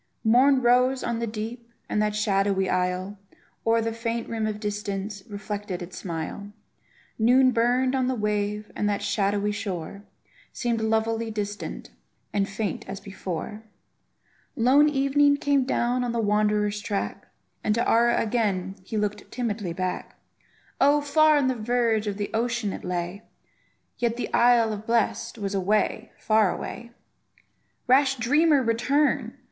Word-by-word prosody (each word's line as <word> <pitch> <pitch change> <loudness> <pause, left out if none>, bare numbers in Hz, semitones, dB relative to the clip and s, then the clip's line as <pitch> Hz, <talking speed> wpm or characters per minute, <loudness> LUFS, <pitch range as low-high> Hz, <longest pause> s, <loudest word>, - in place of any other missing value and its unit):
Morn 255 +4 +4
rose 250 +2 +3
on 235 -1 -2
the 235 - -2
deep, 225 +2 -6 0.2
and 210 - 0
that 210 0 0
shadowy 195 -2 +1
isle, 185 +2 -1 0.5
O'er 230 0 +4
the 225 0 -2
faint 230 0 -3
rim 225 -1 -2
of 210 -1 -4
distance, 205 -1 -4
reflected 205 -3 -5
its 180 +1 -10
smile; 175 +4 -5 0.7
Noon 255 +3 +5
burned 250 +2 +2
on 260 -1 +1
the 260 - 0
wave, 210 -1 -2
and 210 - 0
that 205 0 -1
shadowy 205 0 0
shore 200 -2 -5 0.5
Seemed 235 -2 -1
lovelily 225 +1 0
distant, 210 -1 -5 0.4
and 200 -1 0
faint 210 +1 -3
as 195 0 -5
before; 195 +2 -6 0.9
Lone 275 +6 +5
evening 285 +1 +3
came 285 -2 +2
down 250 0 0
on 240 -1 -2
the 235 - -1
wanderer's 210 -1 +1
track, 205 -1 -3 0.4
And 210 - +1
to 235 - 0
Ara 235 +1 +4
again 200 -4 -1
he 215 +3 -5
looked 210 0 -2
timidly 220 -7 -3
back; 185 +1 -4 0.6
Oh! 285 +2 +5
far 310 +1 +4
on 285 - +2
the 260 - +2
verge 230 -2 0
of 200 -1 -2
the 205 -1 -3
ocean 235 -2 -1
it - - -8
lay, 180 +2 -3 0.8
Yet 235 -1 0
the 245 - -4
isle 235 -2 +4
of 210 - -4
the 215 - -15
blest 230 0 0
was 200 -2 -3
away, 210 +3 0
far 215 -4 +3
away! 235 0 -6 1.0
Rash 265 +1 +4
dreamer, 290 +4 +3
return! 260 +6 +1
220 Hz, 150 wpm, -25 LUFS, 205-245 Hz, 1.0 s, Noon